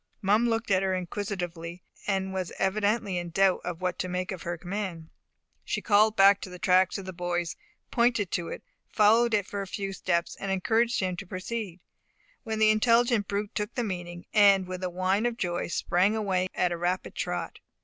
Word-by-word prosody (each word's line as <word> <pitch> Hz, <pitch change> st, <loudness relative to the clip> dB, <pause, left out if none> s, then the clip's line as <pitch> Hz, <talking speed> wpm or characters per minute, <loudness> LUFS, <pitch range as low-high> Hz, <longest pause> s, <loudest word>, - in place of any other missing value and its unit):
Mum 215 Hz, +5 st, +3 dB
looked 225 Hz, -1 st, -1 dB
at 190 Hz, -1 st, +4 dB
her 190 Hz, -1 st, 0 dB
inquisitively, 180 Hz, -2 st, -5 dB, 0.2 s
and 190 Hz, -1 st, -1 dB
was 185 Hz, -2 st, -3 dB
evidently 205 Hz, -1 st, 0 dB
in 175 Hz, 0 st, -5 dB
doubt 195 Hz, +2 st, +2 dB, 0.2 s
what 180 Hz, -1 st, -2 dB
to 185 Hz, -, -1 dB
make 180 Hz, +1 st, -2 dB
of 185 Hz, -, -6 dB
her 175 Hz, 0 st, -4 dB
command. 175 Hz, -2 st, -5 dB, 0.5 s
She -, -, -2 dB
called 215 Hz, 0 st, +3 dB
him 195 Hz, +1 st, +8 dB
to -, -, -6 dB
the 180 Hz, -, -9 dB
track 185 Hz, +2 st, +3 dB
of 195 Hz, -, -7 dB
the 185 Hz, -, -6 dB
boys, 175 Hz, -1 st, -2 dB, 0.4 s
pointed 235 Hz, -5 st, +2 dB
to 170 Hz, -1 st, -2 dB
it, -, -, -7 dB, 0.3 s
followed 225 Hz, +2 st, +4 dB
it 205 Hz, -2 st, +1 dB
for 200 Hz, +1 st, -4 dB
a 195 Hz, -, -5 dB
few 195 Hz, 0 st, -4 dB
steps, 170 Hz, -2 st, -1 dB
and 195 Hz, -, -5 dB
encouraged 225 Hz, +5 st, +1 dB
him 185 Hz, -2 st, -1 dB
to -, -, -7 dB
proceed, 185 Hz, -1 st, -5 dB, 0.6 s
when 220 Hz, -1 st, -4 dB
the 215 Hz, 0 st, +5 dB
intelligent 230 Hz, 0 st, +3 dB
brute 205 Hz, +1 st, -3 dB
took 210 Hz, 0 st, -3 dB
the 245 Hz, -, 0 dB
meaning, 175 Hz, -4 st, -5 dB
and 200 Hz, -3 st, +6 dB
with 185 Hz, 0 st, -6 dB
a 185 Hz, -, -1 dB
whine 185 Hz, +5 st, +1 dB
of 235 Hz, -1 st, -4 dB
joy 175 Hz, -5 st, -2 dB
sprang 185 Hz, +4 st, +1 dB
away 190 Hz, -4 st, 0 dB
at 180 Hz, -, +1 dB
a 170 Hz, -, -2 dB
rapid 180 Hz, +2 st, -2 dB
trot. -, -, -4 dB
190 Hz, 195 wpm, -28 LUFS, 180-210 Hz, 0.6 s, him